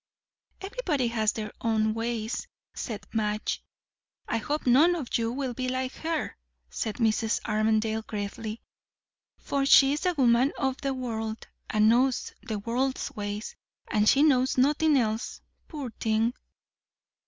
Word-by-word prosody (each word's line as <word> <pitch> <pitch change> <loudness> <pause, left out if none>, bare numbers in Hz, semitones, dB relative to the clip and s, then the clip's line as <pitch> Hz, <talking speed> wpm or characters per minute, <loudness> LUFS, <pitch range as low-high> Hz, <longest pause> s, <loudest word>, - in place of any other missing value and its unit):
"Everybody 385 - -1
has 220 -2 +1
their 215 -1 -5
own 220 -1 +1
ways," 225 0 -3 0.3
said 220 -4 -5
Madge. 215 -1 -1 0.6
"I - - 0
hope 290 +7 -2
none 295 +8 +5
of 290 -8 -4
you 230 0 +1
will 260 0 -3
be 255 +2 -2
like 255 0 -2
her," 325 -1 -2 0.4
said 220 - -3
Mrs. 225 -1 +1
Armadale 220 0 +1
gravely; 215 +1 -5 0.7
"for 280 -1 -1
she's 280 +4 +5
a 360 - +1
woman 255 0 +4
of 265 0 -1
the 275 -2 -1
world, 225 -3 -4 0.2
and 215 0 +3
knows 250 +3 +2
the 220 -3 -4
world's 245 +5 -1
ways, 205 +1 -4 0.4
and 210 -1 +4
she 280 - +5
knows 260 -4 +3
nothin' 295 +3 +4
else, 225 -2 -1 0.3
poor 285 -7 -6
thing!" 220 +2 +1
235 Hz, 135 wpm, -27 LUFS, 220-270 Hz, 0.7 s, none